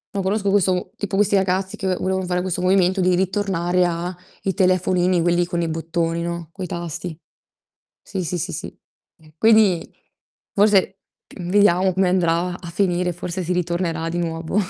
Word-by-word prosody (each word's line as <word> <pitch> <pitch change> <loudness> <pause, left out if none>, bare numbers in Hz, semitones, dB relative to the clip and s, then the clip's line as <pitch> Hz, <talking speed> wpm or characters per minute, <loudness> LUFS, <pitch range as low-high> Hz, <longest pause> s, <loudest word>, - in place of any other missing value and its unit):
No, 195 - 0
conosco 195 +1 0
questo 185 -2 +1
tipo 205 -1 -3
questi 200 0 +3
ragazzi 190 0 0
che 190 - -4
ve 185 - +1
volevan 190 0 -2
fare 180 0 0
questo 180 -1 -2
movimento, 185 0 +3
di 180 0 +3
ritornare 180 -2 0
a 175 +1 -2 0.3
i 195 - 0
telefonini, 185 -1 +2
quelli 175 0 +2
con 175 -1 -2
i 165 - -1
bottoni, 165 +1 -2
no, 170 -1 -4
coi 185 -1 -6
tasti. 170 -1 -5 0.8
Sì, 190 -2 -4
sì, 175 +2 -2
sì, - - -3
sì. - - -6 0.4
Eh, 155 -1 -21
quindi, 215 -5 +4 0.6
forse 195 -2 +3 0.4
vediamo 185 0 +3
come 190 0 +2
andrà 180 0 +1
a 170 -2 -9
finire, 180 -1 0
forse 175 +2 -5
si 175 - -1
ritornerà 170 -2 -1
di 170 +1 -3
nuovo 165 +1 -3
180 Hz, 165 wpm, -21 LUFS, 170-190 Hz, 0.8 s, quindi